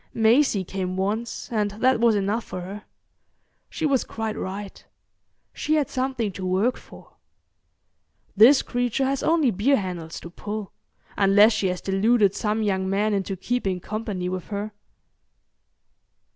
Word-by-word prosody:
Maisie 225 -2 +3
came 185 0 -4
once, 215 +5 -2
and 210 -3 0
that 255 0 +3
was 230 -2 +4
enough 205 +3 0
for 185 - -7
her. 195 +4 -8 0.8
She 320 - -3
was 275 -4 +2
quite 220 -1 -4
right. 195 +1 -6 0.7
She 310 - 0
had 295 -4 0
something 255 -5 -1
to 190 - -8
work 190 +7 +1
for. - - -16 1.2
This 235 +7 +7
creature 245 +2 -1
has 275 0 -1
only 315 -6 +3
beer 220 +8 +2
handles 175 -5 -5
to 170 - -10
pull, 210 +2 -6 0.5
unless 205 +3 +5
she 215 -3 0
has 180 -1 -3
deluded 200 +1 +2
some 215 0 -1
young 190 -2 0
man 205 +2 +1
into 195 -1 -2
keeping 195 -3 -2
company 205 -2 -4
with 185 -1 -4
her. 205 +1 -4
210 Hz, 145 wpm, -24 LUFS, 190-235 Hz, 1.2 s, This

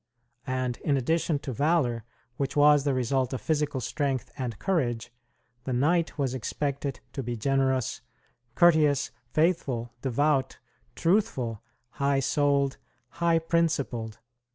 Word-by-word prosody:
And 130 -1 -1
in 140 -2 0
addition 160 +4 +1
to 130 - -3
valor, 140 -4 +1 0.3
which 140 -1 -2
was 145 -1 +5
the 140 - +2
result 130 +1 0
of 130 - -3
physical 150 -3 0
strength 135 +1 -2
and 120 -5 -4
courage, 120 - -1 0.5
the 130 - -2
knight 160 +8 +1
was 135 -3 0
expected 140 +2 -3
to 135 - -3
be 120 -1 -4
generous, 130 +1 0 0.5
courteous, 155 -5 +4 0.2
faithful, 135 -8 0
devout, 135 +1 +1 0.4
truthful, 150 - 0 0.3
high 140 0 +1
souled, 140 0 +1 0.4
high 170 -1 +3
principled. 150 -9 -1
140 Hz, 120 wpm, -27 LUFS, 125-150 Hz, 0.5 s, was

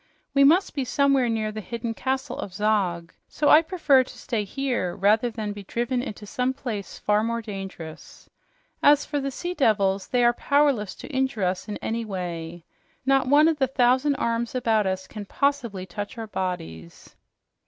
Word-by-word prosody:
We 275 0 +5
must 335 +8 +4
be 275 - -1
somewhere 275 -1 +2
near 220 -1 -1
the 215 0 -6
hidden 230 +2 -4
castle 265 +4 -3
of 190 - -6
Zog, 190 -5 0
so 295 - 0
I 310 - +8
prefer 315 -6 +3
to - - -13
stay 225 -4 -2
here 240 -5 -2
rather 215 +5 +3
than 215 -2 -4
be 205 - -8
driven 240 +5 -2
into 215 -4 -7
some 250 +5 -1
place 225 -7 -5
far 210 0 +1
more 230 +1 -1
dangerous. 195 -7 -9 0.5
As 290 0 +5
for 295 -1 -2
the 275 0 -2
sea 350 +7 -4
devils, 200 - +1
they 245 -1 +1
are 240 0 +5
powerless 280 -7 +1
to - - -10
injure 265 -5 0
us 180 +2 -1
in 210 - -4
any 230 +1 -2
way. 175 -4 -5 0.4
Not 270 -1 +3
one 295 +3 +6
of 320 -2 +1
those 265 -2 +2
thousand 260 +3 +3
arms 235 -1 -1
about 220 -5 +2
us 190 0 -2
can 205 +2 -8
possibly 240 -7 -1
touch 205 +6 -6
our 225 - -4
bodies." 130 - -6
230 Hz, 180 wpm, -25 LUFS, 200-270 Hz, 0.5 s, I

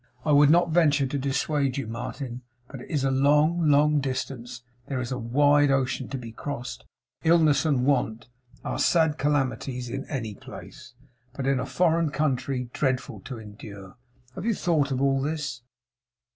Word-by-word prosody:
I 150 - +2
would 145 0 +6
not 170 +1 +4
venture 150 -4 +3
to 135 +2 -2
dissuade 140 0 0
you, 135 - -2
Martin; 120 +2 -6 0.3
but 135 -2 -9
it - - -12
is 145 -3 -1
a 135 - +2
long, 150 +4 +3
long 150 +1 +4
distance; 125 -2 -4 0.2
there 135 -2 -2
is 125 0 -4
a 125 - -2
wide 145 +4 +3
ocean 135 -1 0
to 135 - -4
be 120 -3 -8
crossed; 125 - -6 0.4
illness 160 -2 +4
and 130 -5 +1
want 125 -5 0 0.4
are - - -3
sad 160 -3 +2
calamities 135 -3 -1
in 135 +3 -4
any 115 -7 -4
place, - - -12 0.4
but 135 -1 -5
in 135 -1 +2
a - - -3
foreign 170 -2 +2
country 135 -4 -1
dreadful 130 -2 -1
to 125 -1 -8
endure. 105 -3 -11 0.4
Have 180 - -6
you 230 -2 +1
thought 155 -7 +1
of 135 0 -1
all 135 -1 +2
this? 145 -3 -3
135 Hz, 170 wpm, -26 LUFS, 125-150 Hz, 0.4 s, would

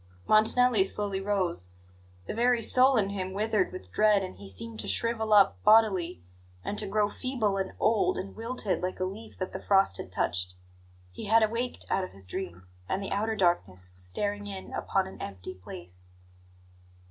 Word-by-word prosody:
Montanelli 220 0 +5
slowly 195 0 0
rose. 185 - 0 0.6
The - - -4
very 240 +2 +3
soul 260 +3 +5
in 200 -2 +2
him 190 -2 -4
withered 220 - 0
with 370 - -9
dread, 210 -2 +4
and 185 - -6
he 100 - -11
seemed 110 +4 -6
to - - -5
shrivel 225 -2 +1
up 200 -2 +5
bodily, 200 - +4 0.4
and - - -2
to 210 - -2
grow 205 +1 +2
feeble, 220 -3 -1
and 190 -1 -3
old, 215 -1 +2
and 195 +1 -6
wilted, 225 -3 -2
like 185 0 -3
a - - 0
leaf 205 +4 -6
that 185 - -4
the 190 - -5
frost 195 - +3
has - - -7
touched. 90 +2 -1 0.6
He 90 - -8
had 220 +2 +5
awaked 230 +3 -2
out 190 - +1
of 185 - -7
his 95 -1 -8
dream, 90 0 -6 0.2
and 195 - -1
the - - -5
outer 220 +2 0
darkness 95 - +1
was 90 - -6
staring 205 - -2
in 195 -2 -8
upon 195 -1 0
an 190 - -10
empty 95 -2 -6
place. 90 -1 -9
195 Hz, 180 wpm, -28 LUFS, 175-220 Hz, 0.6 s, Montanelli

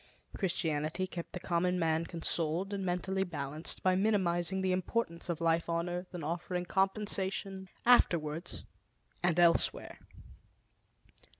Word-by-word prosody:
Christianity 160 -2 -1
kept 175 -2 -7
the 180 - -5
common 180 +1 +1
man 165 -1 +1
consoled 170 +2 0
and 195 -1 -2
mentally 190 +1 0
balanced 155 -3 -4
by 185 - +4
minimizing 190 -2 +1
the 190 - +2
importance 185 -1 -1
of 170 -2 -1
life 165 0 +1
on 170 +1 0
earth 180 +1 -4
and 170 - -5
offering 175 +3 -2
compensation 195 0 -1 0.2
afterwards 170 -9 +3 0.6
and 175 -1 +2
elsewhere. 170 -1 +3
175 Hz, 120 wpm, -32 LUFS, 165-190 Hz, 0.6 s, by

